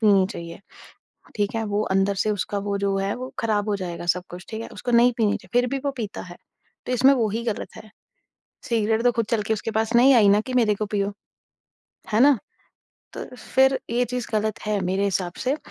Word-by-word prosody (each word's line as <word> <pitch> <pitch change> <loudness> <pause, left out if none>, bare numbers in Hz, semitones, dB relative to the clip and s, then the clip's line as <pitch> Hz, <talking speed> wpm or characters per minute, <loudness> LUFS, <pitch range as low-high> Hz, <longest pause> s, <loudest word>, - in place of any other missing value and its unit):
पीनी 200 -4 +5
चाहिए, 170 0 -8 0.8
ठीक 205 0 -1
है। 225 -1 -1
वो 205 0 -1
अंदर 195 +1 +2
से 215 - +1
उसका 205 0 -2
वो 200 - 0
जो 195 -1 0
है 195 +1 -1
वो 255 +1 -7
खराब 215 -2 0
हो 205 - +1
जाएगा, 175 -2 -6
सब 180 +1 +1
कुछ, 180 +1 -9
ठीक 220 0 -5
है। - - -7
उसको 245 - -5
नहीं 240 +1 +5
पीनी 215 -3 +2
चाहिए - - -15
फिर 250 - -1
भी 275 - -1
वो 285 - +1
पीता 215 -3 -5
है। - - -12 0.5
तो - - -2
इसमें 260 +2 +5
वो 230 -4 +1
ही 225 +3 -2
गलत 225 -1 -4
है, 215 - -12 0.8
सिगरेट 225 -1 +1
तो 245 - +5
खुद 230 -1 -1
चल 225 -2 +2
के 220 - 0
उसके 220 +1 -4
पास 220 +2 0
नहीं 260 +3 +7
आई 215 -4 +6
ना 205 +1 +5
कि 255 - -7
मेरे 210 -2 +2
को 210 +1 -2
पियो, 200 -1 -1 1.0
है 215 - +4
ना? 280 0 +6 0.8
तो - - -6
फिर 265 +1 +2
ये 240 +1 +2
चीज़ 250 -1 -3
गलत 215 -1 0
है 210 -2 0
मेरे 190 +2 0
हिसाब 185 -3 -1
से। 265 +3 +1
215 Hz, 225 wpm, -24 LUFS, 200-235 Hz, 1.0 s, नहीं